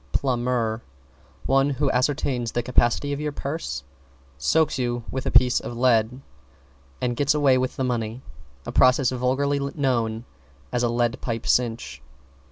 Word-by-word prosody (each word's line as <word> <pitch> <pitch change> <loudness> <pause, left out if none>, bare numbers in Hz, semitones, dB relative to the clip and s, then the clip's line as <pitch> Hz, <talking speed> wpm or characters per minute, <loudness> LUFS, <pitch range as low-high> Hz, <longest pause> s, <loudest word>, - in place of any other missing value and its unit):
=PLUMBER= 120 - 0 0.6
One 135 +1 +3
who 135 - 0
ascertains 125 -2 0
the 120 - -1
capacity 125 +3 +1
of 140 - -4
your 150 0 -2
purse, 140 - -4 0.5
soaks 135 - +1
you 120 -1 -1
with 130 0 -3
a - - +2
piece 125 -1 +4
of 120 - -7
lead 120 0 +2 0.8
and 120 -1 -1
gets 145 +3 +2
away 140 -3 +4
with 130 0 -2
the 130 - -2
money 120 -1 -2 0.4
a - - -5
process 130 0 +4
vulgarly 130 +3 0
known 125 -5 -1 0.5
as 125 - 0
"a 120 - +1
lead 120 +1 0
pipe 115 -2 -4
cinch." 115 - 0
125 Hz, 150 wpm, -24 LUFS, 120-135 Hz, 0.8 s, piece